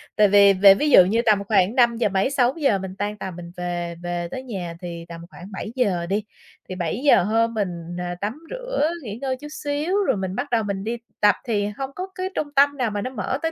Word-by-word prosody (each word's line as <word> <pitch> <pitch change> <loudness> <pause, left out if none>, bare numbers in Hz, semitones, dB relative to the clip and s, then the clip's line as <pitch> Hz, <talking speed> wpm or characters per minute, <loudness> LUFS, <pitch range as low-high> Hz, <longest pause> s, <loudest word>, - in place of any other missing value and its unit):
Tại 210 -1 +5
vì 200 0 +6
về 195 +1 +8
ví 295 +9 0
dụ 185 -10 +8
như 220 +5 +1
tầm 210 -3 +3
khoảng 200 +1 +2
năm 235 -2 +4
giờ 225 - +1
mấy 195 +5 +1
6:00 270 -3 +2
mình 190 0 -7
tan 205 +1 -3
tầm 190 -3 -6
mình 170 -1 -9
về 175 -1 -3
về 175 0 -3
tới 260 - -5
nhà 185 -9 -6
thì 170 -2 -7
tầm 165 0 -8
khoảng 185 +2 -12
7:00 205 -4 -1
đi, 200 +4 -1 0.5
thì 185 - -4
7:00 185 - +2
hơn 230 +3 +1
mình 205 -4 -1 0.3
n - - -4 0.2
tắm 215 +7 -3
rửa - - -1
nghỉ 210 -4 -6
ngơi 260 -2 -2
chút 295 - -9
xíu 295 +5 -2
rồi - - +2
mình 190 0 -3
bắt 280 +3 -3
đầu 230 -2 +2
mình 200 -2 -3
đi 230 +3 -3 0.2
tập 210 -1 +5
thì 205 -4 0
hông 270 -1 -3
có 370 +1 -4
cái 370 0 -3
trung 290 -1 -2
tâm 285 +1 +4
nào 245 -5 0
mà 205 0 -3
nó 255 - -3
mở 255 +2 -3
tới 325 - -1
210 Hz, 240 wpm, -23 LUFS, 190-260 Hz, 0.5 s, về